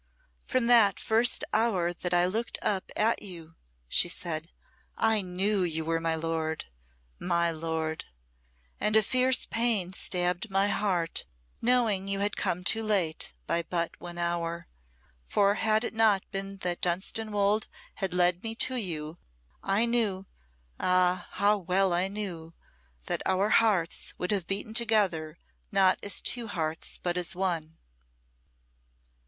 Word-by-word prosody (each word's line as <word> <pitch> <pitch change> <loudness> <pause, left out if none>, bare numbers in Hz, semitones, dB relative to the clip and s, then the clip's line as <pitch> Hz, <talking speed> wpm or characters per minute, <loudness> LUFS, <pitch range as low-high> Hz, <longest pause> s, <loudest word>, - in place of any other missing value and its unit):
"From 255 -3 +1
that 230 -4 +5
first 225 +2 +2
hour 195 -6 +1
that 175 0 -4
I 175 0 +4
looked 220 +6 -2
up 195 -3 -1
at 225 +2 +1
you," 170 -5 -9 0.3
she 175 - +2
said, 165 -2 -3 0.5
"I 220 -1 +3
knew 190 +2 0
you 160 -3 -1
were 165 0 0
my 165 0 0
lord 160 -1 -3 0.5
my 170 -1 +1
lord! 160 -1 -3 0.7
And 210 +1 +1
a 220 - +6
fierce 255 +3 +3
pain 225 -6 +1
stabbed 180 +3 0
my 195 +1 +2
heart, 185 -5 -1 0.3
knowing 225 -6 +2
you 195 0 +1
had 205 +1 0
come 180 +1 -1
too 220 +5 +2
late 190 - 0
by 170 - 0
but 170 0 -2
one 175 0 -8
hour; 170 -1 -2 0.6
for 200 0 +3
had 215 +1 +1
it - - -4
not 220 -3 +3
been 195 0 -4
that 175 -1 -2
Dunstanwolde 205 +3 +1 0.3
had 195 -2 -3
led 180 0 +2
me 225 0 -3
to 255 +2 +1
you, 165 -6 -3 0.4
I 195 +4 +2
knew 220 -5 0 0.5
ah! 180 -1 +2
how 205 +1 +2
well 185 +1 +1
I 180 +2 +1
knew 180 -5 -6 0.5
that - - -1
our 190 +2 +1
hearts 210 -7 +2
would 180 - -3
have 195 -5 -1
beaten 205 +3 -3
together 200 -9 +1 0.3
not 190 -2 +4
as 200 - +3
two 240 -2 0
hearts 160 -5 -3
but 175 0 -2
as 175 -1 -1
one." 170 -4 -2
190 Hz, 145 wpm, -28 LUFS, 170-215 Hz, 0.7 s, a